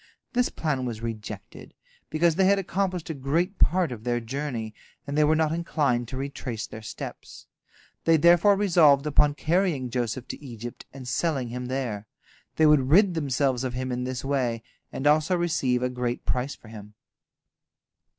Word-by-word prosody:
This 245 0 +2
plan 150 -5 -2
was 115 -3 -5
rejected, 110 -2 -7 0.3
because 165 +1 +2
they 190 +4 +2
had 200 +1 +4
accomplished 185 -3 -2
a - - -3
great 160 +8 -1
part 180 -3 +3
of 110 -3 -7
their 120 0 0
journey, 120 -2 -4 0.3
and 140 0 -4
they 150 - +4
were 155 +1 +4
not 155 -1 +1
inclined 145 -7 0
to 130 - -6
retrace 130 -5 -4
their 110 - -9
steps. 105 - -8 0.6
They 165 0 +5
therefore 175 +5 +5
resolved 160 -8 +4
upon 150 0 +3
carrying 160 -7 0
Joseph 120 0 -2
to - - -7
Egypt 120 -2 -8
and 130 -2 -10
selling 135 -1 -1
him 125 +1 -5
there. 120 -5 -3 0.5
They 160 - +4
would 145 -4 +4
rid 190 +4 +5
themselves 135 -4 0
of 125 -2 -3
him 130 0 -3
in 125 0 -2
this 130 +1 -4
way, 125 -5 -1 0.3
and 135 - -5
also 155 +4 +4
receive 135 -8 0
a - - +2
great 125 -1 -3
price 125 +5 -1
for 110 - -16
him. 105 -1 -11
135 Hz, 170 wpm, -26 LUFS, 125-160 Hz, 0.6 s, They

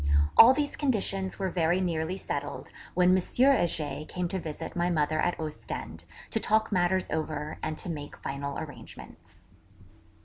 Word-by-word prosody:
All 235 - +10
these 290 +2 -1
conditions 195 -8 0
were 190 -2 -2
very 175 +1 +2
nearly 170 0 -1
settled, 145 -6 -5 0.2
when 180 +1 +5
M. 185 - +2
Heger 175 - +2
came 180 -1 -2
to 190 - -2
visit 160 -1 -6
my 175 0 +1
mother 155 -2 +1
at 175 - 0
Ostend; 155 -1 -6 0.3
to 225 - +1
talk 220 +1 +2
matters 185 0 +2
over 155 -1 -3
and 155 - -3
to - - -3
make 150 -4 -6
final 140 +1 -4
arrangements. 155 -2 -11
175 Hz, 150 wpm, -28 LUFS, 155-190 Hz, 0.3 s, All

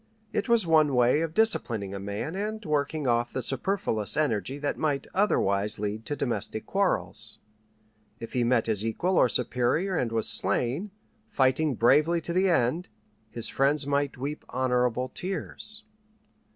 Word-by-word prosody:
It - - -1
was 230 -4 +4
one 155 -4 +4
way 125 +5 +4
of 165 0 -3
disciplining 115 - +1
a 100 - -5
man 100 - -4
and 215 +2 -4
working 150 0 -1
off 120 -1 +1
the 130 - -3
superfluous 135 - -1
energy 135 -2 0
that 145 0 -2
might 145 -3 -1
otherwise 105 - +1
lead 105 +2 -4
to 145 - -2
domestic 120 -5 -2
quarrels. 195 -1 -1 0.8
If 115 - -8
he 125 - +1
met 120 -1 +2
his 110 -2 0
equal 175 +12 0
or 125 - +4
superior 125 - 0
and 125 -7 -1
was 115 -1 +2
slain, 135 - +1 0.4
fighting 135 +3 +2
bravely 150 +9 +4
to 170 - -4
the 185 +2 +3
end, 165 +2 +1 0.4
his 115 0 -2
friends 140 +1 +1
might 145 -1 -1
weep 145 +4 -5
honorable 125 -1 0
tears. 195 +4 -5
135 Hz, 150 wpm, -27 LUFS, 120-165 Hz, 0.8 s, was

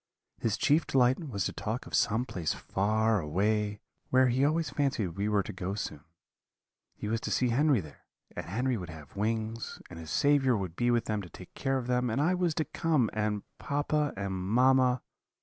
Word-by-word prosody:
"'His 115 -3 0
chief 150 +3 +3
delight 130 -1 +3
was 100 -6 -2
to - - -2
talk 110 +3 -3
of - - -12
some 115 +3 +2
place 90 -10 -2
far 110 +2 +1
away, 105 +6 0 0.3
where 130 0 +5
he 130 +3 +2
always 155 -1 +1
fancied 135 -9 0
we 100 +5 -2
were 105 -2 +2
to - - -7
go 95 +1 -3
soon: 75 -8 -5 0.9
he - - -5
was 110 +1 -1
to - - -3
see 125 - +2
Henry 135 -1 +3
there, 75 -3 -14 0.3
and - - -5
Henry 125 +7 0
would 90 -4 -6
have 80 0 -11
wings, 110 +2 -2
and 85 - -8
his 80 -1 -8
Saviour 135 - +3
would 95 -4 -4
be 120 +4 +1
with 120 -1 +2
them 105 -1 -1
to 90 - -10
take 90 - -12
care 135 -1 0
of 130 - -3
them, 125 0 +1
and 115 +4 0
I 160 +5 +3
was 180 -3 0
to 155 - 0
come, 155 -9 +1
and 105 -1 -1 0.2
papa 145 +1 0
and 100 -1 -2
mamma. 125 +6 +3
115 Hz, 200 wpm, -30 LUFS, 100-130 Hz, 0.9 s, where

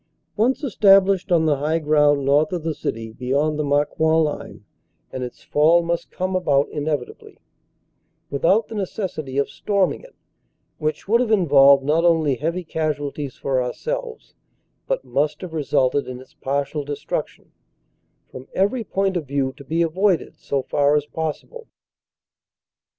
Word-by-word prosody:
Once 250 +7 +1
estab 195 -6 +5
lished 195 -1 -1
on 165 -2 +4
the 150 -2 +2
high 155 +4 0
ground 150 -2 +2
north 145 +3 +3
of 175 -3 -3
the 160 -1 -1
city 115 -6 -5
beyond 140 +5 -1
the - - +1
Mar 145 0 +2
coing 160 +2 +2
line, 150 -1 -5 0.5
and 130 - -4
its 125 - -8
fall 165 +4 +3
must 170 0 -2
come 185 +1 -3
about 145 -6 +2
inevitably, 145 -4 -4 0.9
without 170 +10 +2
the - - -9
necessity 180 -9 -4
of 140 - +2
storming 195 +6 -1
it, - - -17 0.6
which 155 +2 -3
would 230 +4 +3
have 245 - 0
involved 140 -9 +5
not 155 +4 +2
only 160 -4 +3
heavy 165 +8 -2
casualties 150 -4 -3
for 130 -2 -1
ourselves, 465 - -5 0.5
but - - -2
must 150 +2 -1
have 180 -3 -7
resulted 140 -2 +1
in 125 -1 -7
its 130 - -16
partial 140 +2 -2
destruction, 145 0 -5 0.8
from 130 +1 -11
every 210 +5 +1
point 195 -1 -1
of 160 -5 -3
view 135 -1 -1
to 140 - -12
be 165 +5 0
avoided 180 +2 0
so 140 -2 -3
far 145 +2 +2
as 150 -1 +1
possible. 160 - -6
155 Hz, 155 wpm, -22 LUFS, 140-185 Hz, 0.9 s, estab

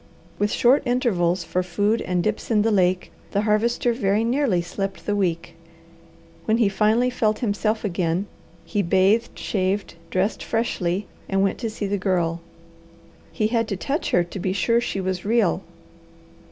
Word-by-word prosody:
With 205 0 +1
short 250 +4 +4
intervals 185 -8 +1
for 180 +2 -1
food 205 +5 0
and 180 -1 -1
dips 215 0 -2
in 215 -3 +3
the 225 - +2
lake 185 -2 +1 0.2
the 200 - +2
Harvester 225 +3 +1
very 210 -2 +1
nearly 240 -5 +1
slept 195 +3 -4
the 205 - 0
week. 175 -4 -1 0.9
When 220 - +2
he 225 -4 +3
finally 220 +5 +2
felt 215 -3 +1
himself 215 +1 0
again, 175 -1 0 0.4
he 205 - 0
bathed, 195 +5 +2
shaved, 195 0 -1 0.2
dressed 190 +4 0
freshly, 195 -4 -1 0.2
and 195 0 +2
went 195 - 0
to 230 - -2
see 215 -1 -4
the 200 0 -1
Girl. 175 -3 0 0.9
He 215 - -1
had 230 -1 +1
to 200 - -3
touch 280 - -2
her 175 - +3
to 175 +3 -8
be 185 +1 -1
sure 230 +4 +2
she 195 - -3
was 185 -1 -2
real. 210 -4 +2
205 Hz, 165 wpm, -23 LUFS, 185-225 Hz, 0.9 s, short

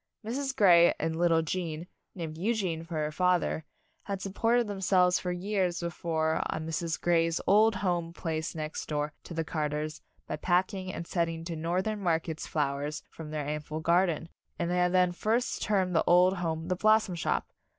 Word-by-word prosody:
Mrs. 265 +4 -2
Grey 175 -4 +6
and 160 +1 -1
lit 175 +1 +2
tle 165 -1 +3
Gene, 165 -1 -3 0.3
named 165 -4 -5
Eugene 185 -3 -1
for 165 0 -7
her 155 -1 -1
father, 180 -2 +1 0.4
had 200 -1 -3
supported 225 +5 +1
themselves 185 -3 +2
for 180 - -3
years 180 -1 -1
before 160 -2 -1
on 155 - -3
Mrs. 165 0 -2
Grey's 165 -1 +2
old 215 +2 +5
home 175 -3 -1
place 160 -2 -3
next 155 -1 -4
door 150 0 -2
to 170 - -8
the 165 - 0
Carters 150 -1 -3 0.2
by - - -4
packing 185 +1 0
and 170 - -6
sending 165 -1 -2
to 170 -1 -4
Northern 185 +7 -1
markets 165 -3 -1
flowers 145 0 -2
from 160 -2 -9
their 150 -1 -3
ample 150 +1 -4
garden, 170 0 +2 0.3
and 170 0 -1
they 180 - +1
had 180 0 +3
then 180 -1 +4
first 225 +7 -1
termed 190 -4 +1
the - - +4
old 180 +2 +5
home 165 -2 -2
The 185 - +1
Blossom 215 0 +3
Shop. 170 - -1
170 Hz, 175 wpm, -29 LUFS, 160-185 Hz, 0.4 s, Grey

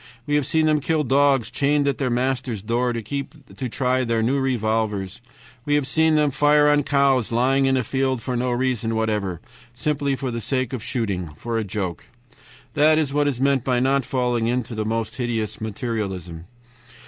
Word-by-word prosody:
We 145 - -2
have 145 -2 +2
seen 160 +1 +2
them 155 -1 +3
kill 155 +1 0
dogs 135 -3 +2
chained 145 0 +1
at 140 - 0
their 130 -3 0
masters' 125 -3 -1
doors 120 +2 0
to 140 +1 -6
try 130 +1 0
their 115 -2 0
new 135 +5 +1
revolvers, 110 -6 -1 0.4
we 145 +2 +1
have 145 -2 +1
seen 160 +3 +2
them 150 -1 +3
fire 145 +2 +4
on 145 0 +4
cows 140 -4 +2
lying 135 +3 +2
in 135 0 +2
a 130 - 0
field 130 +1 0
for 125 +2 -3
no 125 +1 0
reason 120 -2 -1
whatever, 105 -6 -1 0.3
simply 140 +1 -1
for 130 -1 -4
the 115 0 -4
sake 130 +2 -1
of 125 - -3
shooting, 100 - -2
for 115 +4 -2
a - - -1
joke. 95 -5 -4 0.7
"That 155 +1 +4
is 150 -3 0
what 145 0 +2
is 135 -4 -1
meant 135 -2 +2
by 125 -2 +1
not 135 +2 +2
falling 120 -2 0
into 120 -1 -1
the 110 -1 -3
most 115 0 -2
hideous 115 -5 -2
materialism. 100 -7 -4
125 Hz, 185 wpm, -22 LUFS, 115-140 Hz, 0.7 s, fire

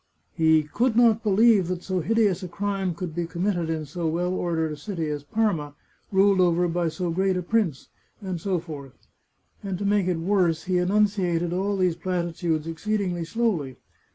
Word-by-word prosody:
He 160 -1 +4
" 150 - -19
could 240 0 +1
not 230 -2 +5
believe 210 -2 +4
that 180 0 -3
so 185 -1 -1
hideous 205 +1 +1
a 185 - -5
crime 195 -1 -2
could 170 -1 -5
be 170 0 -2
committed 175 -1 -1
in 160 -1 -2
so 165 +3 -3
well 175 +3 -1
ordered 165 -3 -1
a - - -4
city 165 +1 -4
as 145 -1 -4
Parma, 155 -5 -1 0.4
ruled 195 -1 +4
over 175 0 +3
by 170 0 0
so 165 +2 -2
great 190 +2 +1
a 180 - -2
prince," 180 - 0 0.3
and 185 -5 -5
so 190 -1 0
forth. 150 -6 -8 0.7
And 195 -3 -4
to 200 - -4
make 200 -2 +2
it 180 -2 +1
worse, 170 -2 +1
he 180 -1 +1
enunciated 180 -3 +1
all 195 +2 0
these 180 -3 +2
platitudes 170 -2 -2
exceedingly 175 +1 -2
slowly. 170 - -1
180 Hz, 180 wpm, -25 LUFS, 165-200 Hz, 0.7 s, not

